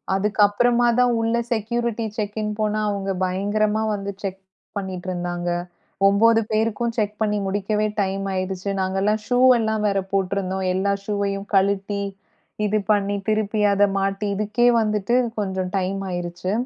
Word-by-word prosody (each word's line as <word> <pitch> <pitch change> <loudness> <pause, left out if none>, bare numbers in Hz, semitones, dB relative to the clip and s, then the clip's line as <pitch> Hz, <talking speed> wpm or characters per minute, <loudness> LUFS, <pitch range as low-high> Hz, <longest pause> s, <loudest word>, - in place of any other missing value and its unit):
அதுக்கப்பறமாதான் 235 +4 +3
உள்ள 225 0 0 0.2
security 235 +1 -1
check in 210 0 -2
போனா, 215 0 0
அவங்க 195 -1 -2
பயங்கரமா 210 +3 0
வந்து 200 0 -4
செக் 195 -1 -4 0.4
பண்ணிட்டு 190 -2 -5
இருந்தாங்க. 175 -1 -3 0.6
9 225 +3 +5
பேருக்கும் 225 +2 0
செக் 210 -1 0
பண்ணி 210 -1 +1
முடிக்கவே 205 +2 0
டைம் 195 0 -1
ஆயிடுச்சு. 185 +1 -3
நாங்க 190 0 -1
எல்லாம் 210 +1 +1
ஷூ 245 0 +2 0.2
எல்லாம் 220 -1 0
வேற 195 -1 +1
போட்டுருந்தோம். 190 -1 -1
எல்லா 195 +2 +1
ஷூயும் 200 -1 -2
கழட்டி, 200 +1 +1 0.6
இது 210 +1 +1
பண்ணி 205 -1 +1
திருப்பி 215 0 0
அத 200 +1 +3 0.2
மாட்டி, 195 +1 -1
இதுக்கே 215 +4 +1
வந்துட்டு 215 +1 0 0.2
கொஞ்சம் 190 -2 -2
டைம் 195 +1 -1
ஆயிருச்சு. 175 +1 -3
205 Hz, 135 wpm, -22 LUFS, 195-215 Hz, 0.6 s, 9